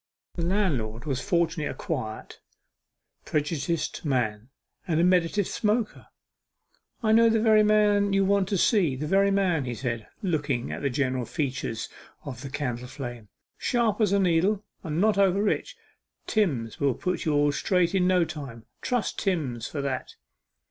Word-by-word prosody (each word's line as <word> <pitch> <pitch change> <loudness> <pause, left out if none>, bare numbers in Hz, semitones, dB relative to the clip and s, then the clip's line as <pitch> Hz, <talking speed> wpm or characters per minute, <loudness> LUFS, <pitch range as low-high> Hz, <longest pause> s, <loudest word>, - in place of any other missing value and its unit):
The 170 - -4
landlord 155 - -1
was 135 -4 -2
fortunately 170 -4 0
a - - -5
quiet, 120 -9 -5 0.8
prejudiced 155 +2 -2
man, 120 -6 -1 0.4
and 165 -2 +1
a - - +4
meditative 180 +2 +2
smoker. 215 +1 -1 1.0
'I 215 - +3
know 230 +1 +6
the 225 0 +2
very 215 -1 +5
man 210 -1 +3
you 195 0 +3
want 195 -1 +2
to 200 - +1
see 180 - +3
the 145 +4 -4
very 195 +5 +3
man,' 185 -7 +1
he 120 -1 -3
said, 115 -2 -4 0.2
looking 145 -9 -1
at - - -5
the 140 - 0
general 130 -1 -1
features 130 -5 -3 0.4
of 130 -4 -7
the 140 - -6
candle 125 -3 -3
flame. 120 -5 -7 0.3
'Sharp 230 -3 +1
as 210 -3 +3
a 200 - +4
needle, 190 +3 +2 0.2
and 160 -2 -2
not 210 0 +3
over 195 -1 +4
rich. - - -1 0.5
Timms 140 - 0
will 140 -4 +2
put 180 -2 -2
you 155 -2 +1
all 145 0 +3
straight 180 +3 +1
in 185 -2 +3
no 180 -2 +3
time 140 -8 -8 0.2
trust 245 -4 -1
Timms 140 - -1
for 145 -2 -4
that. 135 -2 -3
165 Hz, 160 wpm, -26 LUFS, 135-200 Hz, 1.0 s, know